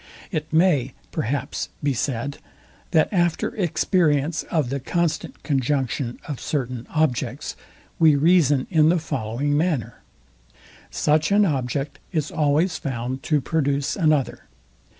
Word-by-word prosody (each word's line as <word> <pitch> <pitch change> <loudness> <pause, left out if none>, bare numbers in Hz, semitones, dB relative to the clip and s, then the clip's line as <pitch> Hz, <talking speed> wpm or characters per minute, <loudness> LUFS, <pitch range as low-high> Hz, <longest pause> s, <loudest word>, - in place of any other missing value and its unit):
It 155 -4 -3
may, 155 -7 +3 0.2
perhaps, 140 +5 -2
be 145 -1 +2
said, 130 +2 -2 0.5
that 160 +5 +2
after 175 +5 +1
experience 165 - +1
of 150 -7 0
the 140 - -1
constant 170 +4 -2
conjunction 135 -3 -1
of 145 -5 -4
certain 125 -4 -3
objects, 140 -4 -1 0.4
we 160 -3 +6
reason 145 -3 +4
in 160 -2 +5
the 175 - +3
following 140 -2 -2
manner. 150 - -1 0.9
Such 155 +3 +1
an 205 +1 +5
object 140 -2 -2
is 155 -4 -1
always 155 +4 +1
found 130 -1 -4
to 150 -1 +1
produce 140 -1 0
another. 155 -8 +1
145 Hz, 120 wpm, -23 LUFS, 135-160 Hz, 0.9 s, we